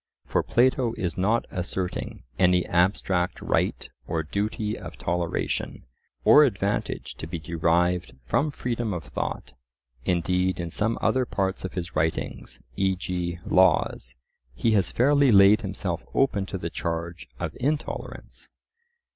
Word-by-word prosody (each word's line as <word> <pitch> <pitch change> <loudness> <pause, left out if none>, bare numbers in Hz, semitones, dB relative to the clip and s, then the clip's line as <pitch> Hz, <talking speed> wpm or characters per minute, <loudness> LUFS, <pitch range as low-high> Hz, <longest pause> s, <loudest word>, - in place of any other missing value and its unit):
For - - +1
Plato 125 -1 +2
is 90 -3 -2
not 105 +6 +1
asserting 90 0 -4 0.2
any 90 -1 +4
abstract 90 0 +1
right - - 0 0.2
or 80 -1 -1
duty 105 +6 -2
of - - -9
toleration, 85 -1 -2 0.4
or 150 - +8
advantage 100 -6 -1
to 80 - -6
be 85 +1 -4
derived 85 +2 0
from 140 - +1
freedom 120 -7 -2
of 85 - -5
thought; - - -5 0.5
indeed, 90 +1 +1
in 85 -1 -4
some 110 +6 0
other 130 -1 +2
parts 95 -3 -1
of 95 - -5
his 90 -2 -5
writings 75 -5 -2 0.2
(e.g. 90 -2 -1
Laws), - - +2 0.4
he 115 - +1
has 95 -9 +3
fairly 140 - +4
laid 100 0 +7
himself - - -3
open 105 -8 +2
to 95 - -4
the 85 -2 -5
charge 85 +1 -4
of - - -4
intolerance. 145 +4 -4
90 Hz, 130 wpm, -26 LUFS, 85-110 Hz, 0.5 s, or